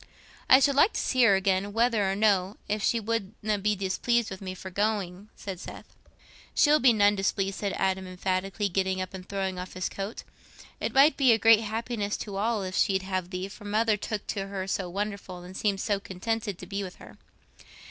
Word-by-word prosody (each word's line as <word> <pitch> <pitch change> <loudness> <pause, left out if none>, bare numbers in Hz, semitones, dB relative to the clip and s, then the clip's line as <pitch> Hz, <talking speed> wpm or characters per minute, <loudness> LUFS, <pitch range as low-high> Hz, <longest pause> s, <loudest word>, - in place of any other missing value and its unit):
"I 260 - +9
should 280 +1 +3
like 295 +9 +4
to - - -2
see 255 - +1
her 200 -4 +6
again, 195 +1 0
whether 225 -4 +2
or - - -1
no, 200 -2 +2
if 210 0 -1
she 230 - +2
wouldna 215 -1 -2
be 210 +1 +1
displeased 215 +4 0
with 190 - -7
me 185 -1 -5
for 190 0 -9
going," 200 -1 -2
said 190 -3 -7
Seth. - - -10 0.6
"She'll 300 0 +5
be 255 -1 +6
none 205 -2 +4
displeased," 195 0 -1
said 200 -2 -2
Adam 190 0 -1
emphatically, 185 +2 -2
getting 190 0 -1
up 185 0 -4
and 185 -1 -9
throwing 190 -2 -2
off 180 0 -7
his 185 - -2
coat. 200 +3 -6 0.6
"It - - -2
might 280 +4 +6
be 260 -4 +5
a - - +3
great 225 -1 +6
happiness 220 -1 -3
to 200 -2 -6
us - - -1
all 225 -3 0
if 185 0 -5
she'd 190 -1 +2
have 185 -2 -3
thee, 185 0 -4
for 205 +2 -12
mother 215 +1 +2
took 205 0 -4
to 195 -2 -2
her 195 -1 -4
so 190 -1 -2
wonderful 195 -2 -5
and 180 +1 -11
seemed 200 -1 0
so 205 -2 0
contented 205 +1 -3
to - - -9
be 200 0 -4
with 185 -2 -7
her." - - -15
200 Hz, 210 wpm, -27 LUFS, 190-220 Hz, 0.6 s, I